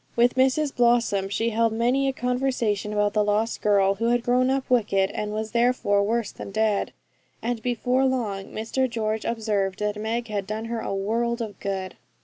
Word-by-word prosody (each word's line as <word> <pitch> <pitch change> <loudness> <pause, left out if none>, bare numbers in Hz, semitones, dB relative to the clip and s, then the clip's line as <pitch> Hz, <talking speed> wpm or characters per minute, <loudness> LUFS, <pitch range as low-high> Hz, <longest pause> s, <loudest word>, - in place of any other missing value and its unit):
With 240 +1 +4
Mrs 265 +3 +2
Blossom 235 -5 +2
she 225 +3 0
held 230 +1 +2
many 245 +4 +1
a - - +2
conversation 250 -5 -1
about 210 -1 +1
the 210 - +3
lost 210 +2 0
girl, 200 -2 +3
who 220 +4 -3
had 240 0 +2
grown 250 +1 +2
up 270 0 0
wicked, 205 -6 +2
and 210 0 -3
was 215 +1 -3
therefore 235 -4 +2
worse 225 +1 0
than - - -8
dead; 215 0 0 0.5
and 235 -1 -2
before 250 +2 +1
long 220 -7 -1
Mr 240 +6 -2
George 220 -2 -2
observed 210 -4 -1
that 210 0 -2
Meg 230 +2 -2
had 205 -3 -3
done 215 +1 -4
her 230 0 -3
a - - -4
world 230 +4 -1
of 215 -5 -6
good. 190 -2 -4
225 Hz, 185 wpm, -25 LUFS, 210-245 Hz, 0.5 s, With